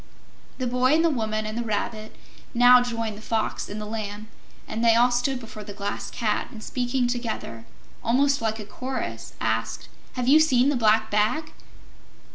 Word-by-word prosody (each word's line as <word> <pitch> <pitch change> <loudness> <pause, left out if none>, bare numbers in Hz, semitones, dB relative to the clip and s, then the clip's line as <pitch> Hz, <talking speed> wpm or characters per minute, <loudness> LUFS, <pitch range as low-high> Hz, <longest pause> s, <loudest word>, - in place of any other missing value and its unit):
The 255 - -2
Boy 250 +3 +3
and 325 +1 +3
the 330 - +3
Woman 215 -4 -1
and 215 0 -4
the 235 - -1
Rabbit 215 0 -3 0.4
now 245 +1 +8
joined 230 -3 -3
the - - -13
Fox 220 -1 -2
and 210 - -5
the 210 - -5
Lamb, 210 0 -5 0.4
and 225 +2 -3
they 230 -1 +6
all 245 +2 +5
stood 245 +2 0
before 220 -2 -9
the 205 0 -9
Glass 200 0 -4
Cat 220 -3 -1
and 220 -2 -10
speaking 250 0 -1
together, 230 - -4 0.4
almost 275 +4 +2
like 220 -1 -1
a 215 - -7
chorus, 235 - -5
asked: 110 0 -2 0.2
"Have 250 -1 -2
you 295 +4 +7
seen 270 -4 +4
the 290 - +1
Black 220 -2 +3
Bag?" 215 +10 +1
230 Hz, 180 wpm, -25 LUFS, 215-250 Hz, 0.4 s, now